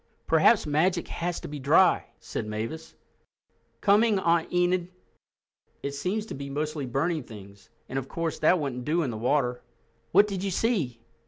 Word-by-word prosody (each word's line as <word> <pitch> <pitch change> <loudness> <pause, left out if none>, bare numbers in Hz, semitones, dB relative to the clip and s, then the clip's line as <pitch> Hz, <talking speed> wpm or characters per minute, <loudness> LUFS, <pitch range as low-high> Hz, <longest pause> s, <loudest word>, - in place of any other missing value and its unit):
"Perhaps 165 +7 +4
magic 170 +4 +1
has 175 0 -3
to - - -7
be 145 0 -6
dry," 150 +7 +4
said - - -5
Mavis. 115 +10 -5 0.9
"Coming, 210 +1 +4
Aunt 170 -3 +1
Enid! 180 0 +1 1.0
It 140 - -2
seems 190 +9 -2
to - - -7
be 140 0 -6
mostly 150 0 -3
burning 155 +6 0
things, 100 -4 -13 0.2
and, 135 - -2
of 135 - -8
course, 165 -1 -3
that 165 +4 +4
wouldn't 135 -5 -3
do 165 +5 +1
in 130 - -2
the - - -5
water. 125 +1 0 0.5
What 205 - +6
did 195 -3 -4
you 200 - 0
see?" 175 - -1
155 Hz, 165 wpm, -27 LUFS, 135-180 Hz, 1.0 s, What